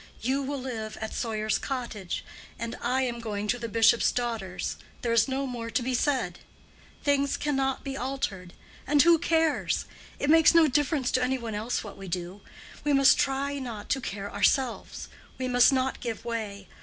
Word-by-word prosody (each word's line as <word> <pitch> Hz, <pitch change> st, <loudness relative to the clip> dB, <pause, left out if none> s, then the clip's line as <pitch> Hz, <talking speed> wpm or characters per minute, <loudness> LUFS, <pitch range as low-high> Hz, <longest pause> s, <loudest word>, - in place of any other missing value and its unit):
You 265 Hz, +4 st, 0 dB
will 280 Hz, +1 st, -3 dB
live 225 Hz, -4 st, -5 dB
at 220 Hz, -, -5 dB
Sawyer's 215 Hz, -2 st, -1 dB
Cottage, 235 Hz, -8 st, -4 dB, 0.3 s
and 230 Hz, +1 st, -4 dB
I 255 Hz, +2 st, +1 dB
am 240 Hz, -2 st, -2 dB
going 210 Hz, -2 st, -3 dB
to 245 Hz, -, +1 dB
the 230 Hz, -1 st, -4 dB
bishop's 225 Hz, +1 st, +4 dB
daughters. 230 Hz, -7 st, -3 dB, 0.3 s
There 235 Hz, -1 st, +1 dB
is 230 Hz, +2 st, +4 dB
no 270 Hz, +1 st, -1 dB
more 240 Hz, -3 st, -5 dB
to 240 Hz, -, 0 dB
be 255 Hz, +1 st, -1 dB
said. 250 Hz, -, 0 dB, 0.6 s
Things 280 Hz, -1 st, +2 dB
cannot 270 Hz, -2 st, -1 dB
be 275 Hz, -1 st, -4 dB
altered, 250 Hz, -9 st, -3 dB, 0.3 s
and 290 Hz, +1 st, +3 dB
who 335 Hz, 0 st, +6 dB
cares? 325 Hz, -2 st, +1 dB, 0.3 s
It 285 Hz, -, +1 dB
makes 325 Hz, +1 st, +6 dB
no 330 Hz, -2 st, +7 dB
difference 290 Hz, -1 st, +1 dB
to 255 Hz, -, +2 dB
any 260 Hz, +1 st, +1 dB
one 230 Hz, -3 st, -5 dB
else 220 Hz, +4 st, -2 dB
what 205 Hz, -2 st, -9 dB
we 195 Hz, -, -8 dB
do. 180 Hz, +2 st, -5 dB, 0.4 s
We 295 Hz, -, +2 dB
must 275 Hz, 0 st, +6 dB
try 280 Hz, +1 st, 0 dB
not 230 Hz, -6 st, -6 dB
to 270 Hz, -, +1 dB
care 200 Hz, -3 st, -5 dB
ourselves. 240 Hz, +5 st, 0 dB, 0.3 s
We 255 Hz, -, -2 dB
must 245 Hz, +1 st, +5 dB
not 265 Hz, 0 st, 0 dB
give 230 Hz, -1 st, -5 dB
way. 210 Hz, -4 st, -4 dB
245 Hz, 180 wpm, -27 LUFS, 220-275 Hz, 0.6 s, no